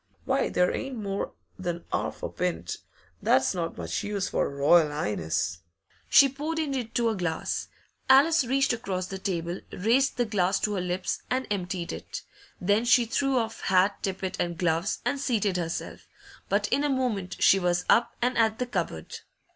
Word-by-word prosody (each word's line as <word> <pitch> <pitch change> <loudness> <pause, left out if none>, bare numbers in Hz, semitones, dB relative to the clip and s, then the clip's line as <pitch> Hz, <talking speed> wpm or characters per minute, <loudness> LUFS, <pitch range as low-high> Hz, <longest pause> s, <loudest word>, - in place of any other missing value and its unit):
'Why, - - +1
there 180 0 +2
ain't 270 -1 -4
more 200 -2 -3 0.3
than 175 -2 -4
'arf - - -2
a - - -2
pint; 85 -1 -3 0.4
that's 130 0 +3
not 170 -2 -3
much 85 -1 -3
use 200 -2 -2
for - - 0
a - - -5
Royal 150 +3 +4
'Ighness.' 85 - -2 0.5
She 280 - +8
poured 295 +4 -4
it 300 -4 -1
into 235 -1 0
a 220 - -1
glass. 175 -4 -2 0.4
Alice 280 +4 +6
reached 265 +1 +2
across 190 -6 -3
the 190 +1 -6
table, 175 -2 -2
raised 240 +8 +2
the 245 - +2
glass 195 -3 +1
to 210 - 0
her 190 - -1
lips, 180 +1 -2
and 260 +1 0
emptied 180 -3 -2
it. - - -7 0.4
Then 205 +5 +2
she 240 0 +5
threw 270 +3 +1
off 225 -2 -2
hat, 190 +2 +2
tippet, 190 -1 -3
and 170 -1 -1
gloves, 170 +3 0
and 280 - 0
seated 215 -8 0
herself 165 -1 -4 0.4
But - - +1
in 280 - +2
a 295 - +1
moment 220 -9 -1
she 195 - +6
was 175 -1 0
up 235 0 +3
and 250 +1 +1
at 220 -1 +3
the 250 - -1
cupboard. 245 - -4
195 Hz, 180 wpm, -27 LUFS, 175-245 Hz, 0.5 s, She